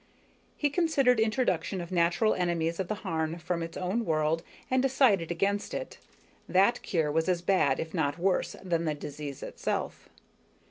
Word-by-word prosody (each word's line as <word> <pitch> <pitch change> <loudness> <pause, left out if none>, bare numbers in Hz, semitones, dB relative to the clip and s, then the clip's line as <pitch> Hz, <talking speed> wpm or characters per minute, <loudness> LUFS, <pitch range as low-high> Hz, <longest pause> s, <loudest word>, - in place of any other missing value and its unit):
He 290 -1 +1
considered 280 -7 +3
introduction 215 -5 0
of 170 +1 -6
natural 175 +5 +3
enemies 170 -1 -1
of 190 - -1
the 215 - -2
Harn 160 0 -1
from 170 +1 -3
its 165 0 -5
own 190 +6 -1
world, 160 -2 +1 0.3
and 260 0 +3
decided 250 - +3
against 200 +4 -1
it. - - -6 0.5
That 195 +6 +3
cure 160 -5 0
was 160 +4 +1
as 175 -1 0
bad, 155 -8 +2
if 160 - -4
not 160 -4 0
worse, 185 +1 0
than 170 -3 0
the 155 -1 0
disease 145 -1 -7
itself. - - -4
175 Hz, 165 wpm, -29 LUFS, 160-210 Hz, 0.5 s, considered